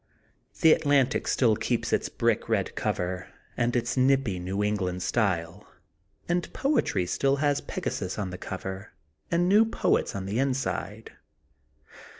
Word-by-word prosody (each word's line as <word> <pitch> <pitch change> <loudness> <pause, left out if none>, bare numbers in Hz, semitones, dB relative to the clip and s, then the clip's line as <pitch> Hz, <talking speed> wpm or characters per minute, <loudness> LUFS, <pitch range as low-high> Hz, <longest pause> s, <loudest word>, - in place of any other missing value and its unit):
The 160 -2 +8
Atlantic 140 -4 +2
still 115 -4 +3
keeps - - -1
its - - +1
brick - - 0
red - - 0
cover 90 0 -2 0.3
and 120 +1 0
its 120 -1 0
nippy 130 -7 +2
New 95 +3 -2
England 95 -4 -1
style 95 -4 -1 0.6
and 175 0 -1
Poetry 260 - +1
still 135 +9 +1
has 145 0 +1
Pegasus 100 - -4
on 100 -3 -3
the 90 - -6
cover 95 +1 -6 0.4
and 175 +1 +2
new 205 +4 +6
poets 225 - 0
on 95 -1 -4
the 100 +5 -2
inside. 110 -6 -2
110 Hz, 140 wpm, -27 LUFS, 95-140 Hz, 0.6 s, The